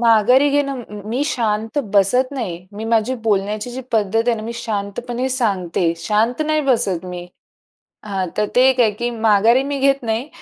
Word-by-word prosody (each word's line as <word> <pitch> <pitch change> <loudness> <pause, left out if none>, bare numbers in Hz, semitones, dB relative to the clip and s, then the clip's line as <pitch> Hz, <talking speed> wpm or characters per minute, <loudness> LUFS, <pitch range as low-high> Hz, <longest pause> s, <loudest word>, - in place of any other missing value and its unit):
माघारी 235 +4 +4
घेणं 275 -3 0 0.3
मी 245 +5 -1
शांत 225 -2 -1
बसत 230 +6 +3
नाही. 180 -10 -5
मी 210 +2 -6
माझी 225 +2 +1
बोलण्याची 210 +1 -1
जी 250 +2 -6
पद्धत 215 -2 +1
आहे 240 - +3
ना, 215 - -6
मी 230 +2 -5
शांतपणे 235 +3 -3
सांगते. 190 -9 0
शांत 215 - 0
नाही 310 0 +1
बसत 220 - 0
मी 180 -1 -7 0.8
हां, 195 -3 -2
तर 210 - +1
ते 250 - +6
एक 260 -1 0
आहे, 225 -3 +5
की 235 +4 -3
माघारी 225 +2 +3
मी 280 0 -3
घेत 275 0 +2
नाही. 230 +4 -2
225 Hz, 175 wpm, -19 LUFS, 205-255 Hz, 0.8 s, ते